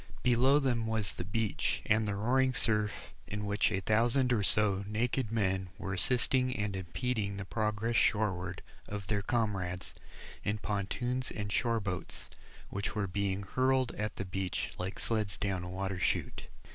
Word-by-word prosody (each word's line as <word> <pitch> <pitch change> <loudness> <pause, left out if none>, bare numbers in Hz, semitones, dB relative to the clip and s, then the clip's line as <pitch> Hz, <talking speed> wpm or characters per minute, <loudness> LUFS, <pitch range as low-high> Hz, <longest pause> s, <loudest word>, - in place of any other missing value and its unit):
Below 125 +3 +5
them 120 -5 +1
was 110 -3 -1
the - - -4
beach 95 -2 0
and 110 0 +3
the 100 - -1
roaring 130 +5 +2
surf, 105 -4 0
in 105 0 -3
which 100 +1 +2
a 95 -2 0
thousand 120 +5 +3
or 110 - +2
so 100 -1 +3
naked 115 +2 0
men 95 -4 0
were 95 - -3
assisting 125 +4 +2
and 105 -2 -1
impeding 100 +2 -2
the 100 - -4
progress 110 +2 0
shoreward 95 -5 +1 0.2
of 105 -1 -5
their 100 +1 0
comrades, 95 -5 -1 0.5
in 105 +1 0
pontoons 120 +5 -1
and 100 -1 -4
shore 115 +1 +2
boats, 95 -3 -5 0.4
which 100 +1 -3
were 105 -2 +1
being 100 +1 -1
hurled 130 +4 +2
at 105 0 -3
the 95 - -4
beach 95 -1 -2
like 90 +2 -3
sleds 110 -4 -1
down 95 -2 -1
a 90 - -5
water 95 0 -3
chute. - - -1
105 Hz, 160 wpm, -32 LUFS, 95-115 Hz, 0.5 s, Below